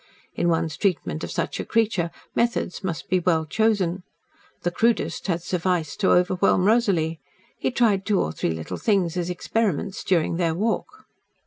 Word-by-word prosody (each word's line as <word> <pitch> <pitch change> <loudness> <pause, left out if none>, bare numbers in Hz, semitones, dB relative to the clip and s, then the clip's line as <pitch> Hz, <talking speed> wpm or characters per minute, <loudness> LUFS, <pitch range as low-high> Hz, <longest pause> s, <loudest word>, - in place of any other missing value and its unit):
In 175 - 0
one's 165 -2 0
treatment 180 -5 -1
of - - -4
such - - -2
a - - -1
creature, 215 -7 +1 0.2
methods 235 -5 -1
must 170 -4 -4
be 185 - +2
well 165 -3 +1
chosen. 190 0 +1 0.6
The 175 - 0
crudest 230 +3 0
had 170 -2 -1
sufficed 180 -3 -1
to 195 - +3
overwhelm 180 +1 +3
Rosalie. 190 -8 +2 0.4
He - - 0
tried 225 -6 +2
two 200 -1 +1
or 80 - 0
three 80 - -2
little 80 -1 -4
things 190 -6 +1
as 175 -1 -2
experiments 195 +1 -1
during 170 -2 +1
their 165 -2 +1
walk. 225 - -2
180 Hz, 160 wpm, -24 LUFS, 165-210 Hz, 0.6 s, to